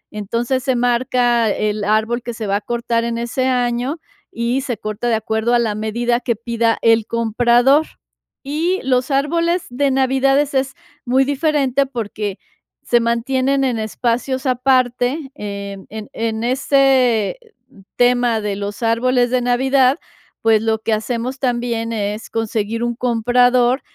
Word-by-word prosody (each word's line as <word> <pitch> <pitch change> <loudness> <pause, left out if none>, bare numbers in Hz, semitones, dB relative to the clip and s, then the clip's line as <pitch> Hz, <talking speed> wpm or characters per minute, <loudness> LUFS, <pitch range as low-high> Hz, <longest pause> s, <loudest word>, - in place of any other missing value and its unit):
Entonces, 235 +5 -2
se 260 -3 +1
marca 240 -1 +2
el 210 0 -1
árbol 220 +3 +1
que 235 -1 -6
se 220 - -5
va 200 0 +1
a - - -6
cortar 235 0 -1
en 235 0 -2
ese 240 +2 -1
año, 245 +3 0 0.3
y 235 +3 -1
se 245 -5 -3
corta 215 +3 -4
de 225 - +2
acuerdo 220 +2 0
a - - +4
la 220 -3 0
medida 235 +3 -1
que 235 -3 -1
pida 230 0 0
el 225 -1 +3
comprador. 240 +6 +3 0.6
Y 325 +7 -1
los 255 +1 +1
árboles 335 +5 +1
de 280 +2 +1
Navidad 270 +1 +2
es 290 -1 -1
es 265 0 0 0.3
muy 260 +2 +2
diferente 280 -2 +1
porque 210 -5 -4 0.5
se 240 - +3
mantienen 260 +4 0
en 245 -4 0
espacios 245 +4 -2
aparte, 255 +2 +1
em, 200 -4 -7
en 215 -1 -8
en 225 0 -2
ese 260 - +2 0.6
tema 245 -2 +2
de 205 -2 -3
los 205 +3 -5
árboles 245 +2 +2
de 255 -1 +2
Navidad, 260 +3 +2 0.5
pues, 220 -1 +4
lo 225 0 +1
que 220 0 -1
hacemos 240 +4 -3
también 235 -3 -1
es 210 0 -3
conseguir 225 0 -2
un 240 0 -1
comprador 245 +2 +2
240 Hz, 150 wpm, -19 LUFS, 225-260 Hz, 0.6 s, a